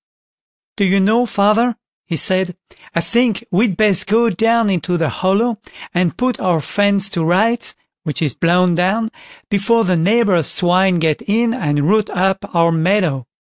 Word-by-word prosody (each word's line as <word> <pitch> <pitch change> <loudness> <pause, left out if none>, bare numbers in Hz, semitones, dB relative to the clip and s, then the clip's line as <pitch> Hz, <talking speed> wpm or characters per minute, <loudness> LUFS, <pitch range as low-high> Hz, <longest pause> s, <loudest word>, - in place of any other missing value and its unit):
"Do 200 - +1
you 195 +1 +2
know, 220 +5 +2
father", 220 +4 +1 0.3
he 170 - -3
said, 185 0 +1 0.4
"I 170 - +1
think 235 +2 0
we'd 195 0 +1
best 210 -5 +2
go 225 +3 +2
down 225 +2 +1
into 180 0 -1
the 165 -3 -1
hollow 215 - -1 0.3
and 175 -1 -1
put 250 0 -1
our 180 -4 0
fence 200 +4 0
to 170 - -2
rights, 220 +8 0 0.3
which 155 -4 -4
is 150 -6 -1
blown 175 +4 +1
down, 195 +6 -1 0.4
before 225 +3 +1
the 185 -2 0
neighbours' 190 - +1
swine 180 +1 +3
get 160 -2 -1
in 230 +3 +1
and 145 - -1
root 215 +2 +1
up 190 +1 -1
our 170 0 +3
meadow." 165 - 0
190 Hz, 160 wpm, -17 LUFS, 175-220 Hz, 0.4 s, swine